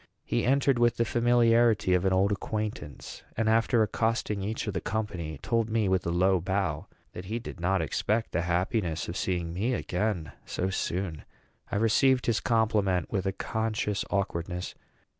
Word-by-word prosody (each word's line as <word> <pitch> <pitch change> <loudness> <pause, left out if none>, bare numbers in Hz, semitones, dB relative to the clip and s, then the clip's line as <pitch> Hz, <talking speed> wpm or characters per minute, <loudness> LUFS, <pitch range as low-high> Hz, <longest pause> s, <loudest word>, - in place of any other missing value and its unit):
He - - 0
entered 135 -1 +3
with 120 0 +3
the 115 - +2
familiarity 115 -4 +3
of 90 +1 +2
an 95 - +3
old 95 +2 +3
acquaintance, 105 - -4 0.2
and, 115 0 +1
after 115 +1 +3
accosting 110 -1 -1
each 110 +3 -3
of 105 - -3
the 95 - -2
company, 90 -8 -3
told 115 -1 +1
me, 110 -2 +1
with 95 -1 +1
a - - +1
low 95 +2 +3
bow, 95 -2 -1 0.3
that 90 - -7
he 110 +5 -3
did 115 -5 -8
not 90 0 +1
expect 110 - -1
the 85 - 0
happiness 85 -1 -1
of 85 - -5
seeing 85 -4 -2
me 115 +8 0
again 90 -5 -2
so 95 +1 -2
soon. 90 -4 -2 0.5
I - - -1
received 125 +5 +3
his 115 -2 +2
compliment 105 -6 +1
with 95 -2 -1
a - - +1
conscious 110 0 -2
awkwardness. 90 -2 -2
100 Hz, 170 wpm, -28 LUFS, 90-115 Hz, 0.5 s, entered